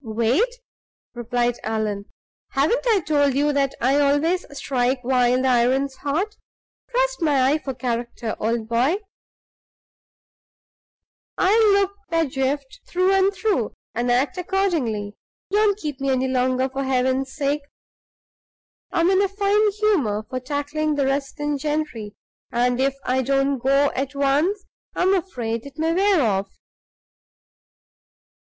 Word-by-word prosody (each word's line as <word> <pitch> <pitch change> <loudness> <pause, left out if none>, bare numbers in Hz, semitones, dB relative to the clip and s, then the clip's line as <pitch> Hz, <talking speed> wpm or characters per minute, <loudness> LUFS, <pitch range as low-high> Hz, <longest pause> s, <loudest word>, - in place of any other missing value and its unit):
"Wait!" 235 - +1 0.6
replied 240 0 -1
Allan. 215 -2 -2 0.5
"Haven't 295 - +2
I 430 -5 +3
told 285 -4 +2
you 295 +1 +2
that 275 -1 0
I 270 +4 +2
always 290 +6 +2
strike 255 -1 0
while 250 0 +2
the - - +2
iron's 260 +2 +2
hot? 335 +9 -2 0.5
Trust - - 0
my 275 -4 +3
eye 300 - +3
for 270 -3 -5
character, 235 -2 -3
old 225 0 -1
boy, 240 +8 +2 2.4
I'll 425 +2 +4
look 400 0 +2 0.2
Pedgift 280 -4 -1
through 365 +1 +2
and 385 0 +4
through, 395 - -1 0.2
and 240 +1 -1
act 275 +9 +1
accordingly. 320 - -1 0.4
Don't 410 -1 +3
keep 295 -9 -5
me 275 - 0
any 260 0 +1
longer, 255 0 +1
for 270 +1 -4
Heaven's 260 0 0
sake. 290 0 0 1.3
I'm 350 0 +2
in 385 0 +4
a 400 - +3
fine 410 +2 +2
humor 310 - +1
for 255 - -4
tackling 290 +3 -2
the 280 -1 +1
resident 280 +1 -2
gentry; 295 -9 -3 0.4
and 245 +1 +1
if 270 0 +1
I 260 +1 +1
don't 275 +1 +1
go 275 +3 +3
at 275 +2 -3
once, 295 +9 +1 0.3
I'm 375 +2 +2
afraid 245 - -2
it 280 - -14
may 325 +1 +1
wear 380 -3 +3
off." 195 -3 0
275 Hz, 130 wpm, -22 LUFS, 250-340 Hz, 2.4 s, I'll